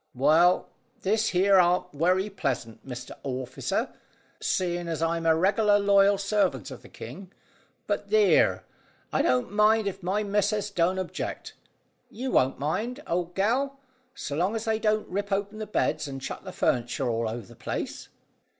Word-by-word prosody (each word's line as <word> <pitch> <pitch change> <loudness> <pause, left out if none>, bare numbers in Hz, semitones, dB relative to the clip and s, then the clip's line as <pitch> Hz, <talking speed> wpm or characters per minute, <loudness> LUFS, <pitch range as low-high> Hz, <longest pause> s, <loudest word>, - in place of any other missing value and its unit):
"Well, 160 +7 +4 0.4
this 220 +3 +2
here 190 +1 +4
arn't 180 0 +2
werry 180 +6 +2
pleasant, 130 - -3
Mr 125 -2 -8
Orficer, 130 -2 -3 0.5
seeing 175 -1 -1
as 165 -2 -2
I'm 165 0 0
a 160 - +5
reg'lar 205 +4 +3
loyal 200 0 +4
servant 195 - 0
of - - -9
the - - -15
king. 180 - -10 0.5
But - - -2
theer, 430 -1 +4 0.5
I - - +3
don't 125 +7 +1
mind 210 +1 +4
if 195 -1 -4
my 190 +4 0
missus 205 0 0
don't 180 0 +1
object. 185 -2 -5 0.6
You 255 +3 -4
won't 130 +1 +2
mind, 220 - -2
old 175 0 -2
gal, 260 +8 +1 0.4
so 145 - -5
long 185 +8 0
as 225 - -3
they 220 -1 0
don't 215 -1 +1
rip 200 +2 -3
open 200 +2 -2
the 215 - -5
beds 155 -7 0
and 135 -1 -6
chuck 135 - -6
the - - -7
furniture 120 +2 0
all 115 -1 0
over 115 -1 -6
the - - -15
place?" - - -5
185 Hz, 160 wpm, -27 LUFS, 150-210 Hz, 0.6 s, a